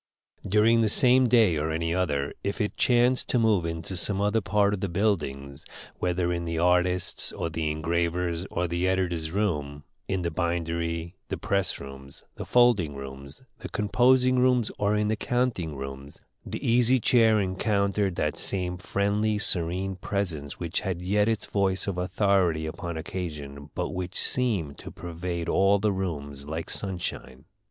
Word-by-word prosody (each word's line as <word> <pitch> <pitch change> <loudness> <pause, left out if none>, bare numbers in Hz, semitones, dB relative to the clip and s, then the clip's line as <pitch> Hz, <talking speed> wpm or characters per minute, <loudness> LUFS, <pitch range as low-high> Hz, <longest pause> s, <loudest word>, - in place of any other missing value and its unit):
During 110 +3 +4
the 110 - +2
same 125 +2 +6
day 110 -9 +4
or 75 +1 -1
any 80 +1 -1
other, 75 -6 -1
if 100 +3 -3
it 105 -2 -1
chanced 125 +1 +3
to - - +2
move 105 -7 +2
into 85 +3 -4
some 95 +2 +1
other 105 +2 +1
part 100 0 +2
of 105 - -2
the 95 - -2
buildings, 75 -8 -2 0.4
whether 90 0 0
in 85 0 -3
the 85 0 -3
artists', 90 +1 +1 0.2
the 80 -2 -1
engravers', 85 +2 -1
or 90 +1 -1
the 85 +2 -1
editor's 90 -4 -1
room; 75 -7 -2 0.2
in 95 -2 -1
the 85 - -1
bindery, 85 0 -2
the - - -3
press 100 -2 0
rooms, 70 0 -11
the - - -8
folding 115 -12 +3
rooms, 70 - -10 0.2
the - - -7
composing 125 +4 +3
rooms, 125 -3 +2
or 105 +1 +2
in 105 0 +1
the 110 - +1
counting 115 - -1
room, 70 0 -7 0.3
the - - -5
Easy 125 +2 +4
Chair 110 -2 +4
encountered 100 0 0
that 75 -2 -1
same 90 -2 -1
friendly, 105 +2 0
serene 95 0 0
presence 85 -8 -3
which 85 -1 -2
had 90 -2 -4
yet 105 +3 +2
its 110 -2 -1
voice 95 -2 0
of 95 -3 -3
authority 90 -3 +1
upon 85 +1 -5
occasion, 75 -5 -6
but - - -2
which 90 0 -3
seemed 100 - +2
to - - -8
pervade 85 0 -5
all 100 +1 +3
the 105 +1 +1
rooms 70 -7 -4
like 80 +2 -4
sunshine. 90 -8 -4
90 Hz, 160 wpm, -26 LUFS, 80-105 Hz, 0.4 s, same